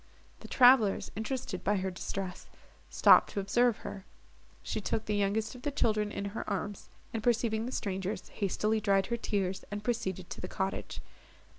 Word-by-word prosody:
The - - -10
travellers, 245 -5 +5
interested 220 -3 -4
by 205 - +2
her 190 -1 -1
distress, 185 +1 -5 0.4
stopped - - +6
to - - -3
observe 230 +4 +2
her. 195 - -6 0.6
She 215 - -3
took 220 +2 -2
the 210 - -1
youngest 205 +2 0
of 250 - -11
the 290 - -1
children 215 -6 +1
in 200 - -4
her - - -3
arms, 205 0 -4 0.2
and, 225 - -2
perceiving 230 -1 +1
the - - -4
strangers, 195 -2 -3
hastily 215 +2 0
dried 195 -2 +3
her - - +1
tears, 195 -5 -2
and 205 0 -5
proceeded 190 -7 -2
to - - -6
the 180 - -4
cottage. 190 +1 -3
210 Hz, 170 wpm, -31 LUFS, 195-225 Hz, 0.6 s, stopped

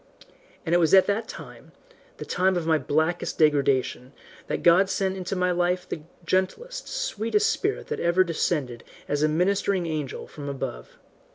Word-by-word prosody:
And 165 - 0
it 175 - +5
was 165 +2 +5
at 190 - +7
that 220 +2 -1
time, - - -11 0.4
the - - -7
time 185 0 +1
of 170 - -2
my 160 -1 +3
blackest 160 +5 -1
degradation, 140 -3 +1 0.3
that - - -3
God 180 +3 +5
sent 190 0 -1
into 185 0 -4
my 180 0 +1
life 180 +1 0
the 160 - -5 0.2
gentlest, 470 - -1
sweetest 430 - 0
spirit 405 -2 -2
that - - -3
ever 170 +2 +3
descended 150 -8 -2 0.2
as 145 0 -1
a 155 - +4
ministering 185 +3 +1
angel 155 -4 -4
from 145 -1 -8
above. 125 - -6
175 Hz, 165 wpm, -25 LUFS, 155-190 Hz, 0.4 s, at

